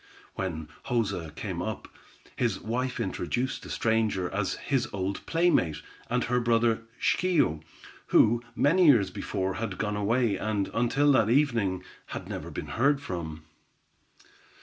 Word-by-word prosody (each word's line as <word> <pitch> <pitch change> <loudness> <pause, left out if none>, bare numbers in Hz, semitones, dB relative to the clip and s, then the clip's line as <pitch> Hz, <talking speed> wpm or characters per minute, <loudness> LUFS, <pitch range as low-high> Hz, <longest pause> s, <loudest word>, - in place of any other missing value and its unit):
When 80 -5 -4 0.2
Joza 110 - -1
came 90 -2 -4
up, 110 +2 -4 0.5
his 115 -6 0
wife 125 +3 -2
introduced 120 +5 -2
the - - -10
stranger 110 -5 0
as 95 0 -1
his 135 -4 -1
old 95 0 -3
playmate, 165 - +2 0.3
and 125 0 +1
her 125 0 +1
brother 115 -1 +2 0.2
Schio, 155 - +2 0.5
who, 115 +2 +5
many 170 +5 +4
years 105 -10 +5
before, 95 0 -2
had 105 -5 -3
gone 105 -1 -1
away, 105 0 +1
and, 105 -1 -1
until 135 +5 +3
that 110 -5 +4
evening, 115 -9 +2 0.2
had - - -6
never - - -5
been - - -5 0.2
heard 140 +1 +4
from. 80 - -5
110 Hz, 135 wpm, -28 LUFS, 95-125 Hz, 0.5 s, who